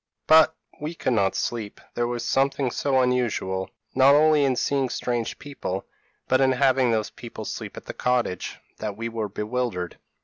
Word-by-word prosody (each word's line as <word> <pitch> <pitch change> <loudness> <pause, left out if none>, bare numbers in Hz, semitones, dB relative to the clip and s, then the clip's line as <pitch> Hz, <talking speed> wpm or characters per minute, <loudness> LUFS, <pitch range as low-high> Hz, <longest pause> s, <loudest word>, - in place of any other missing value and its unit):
p> - - -64 0.3
"But 160 0 +7 0.2
we 155 +3 -4
could 130 - 0
not 100 -4 +2
sleep; 110 -4 -3
there 120 0 0
was 120 -1 -3
something 135 0 +1
so 135 0 +2
unusual, 115 -7 0 0.2
not 135 +2 +6
only 155 0 +5
in 135 -2 +2
seeing 135 +1 0
strange 120 -1 -2
people, 135 -10 -5 0.4
but 130 +1 +3
in 130 -1 +4
having 130 -1 +3
those 110 -2 0
people 120 - -8
sleep - - -6
at - - -8
the - - -6
cottage, 125 -7 -1 0.2
that 105 -2 -4
we 115 +1 -3
were 110 -2 -3
bewildered. 105 -3 -3
125 Hz, 175 wpm, -25 LUFS, 110-135 Hz, 0.4 s, But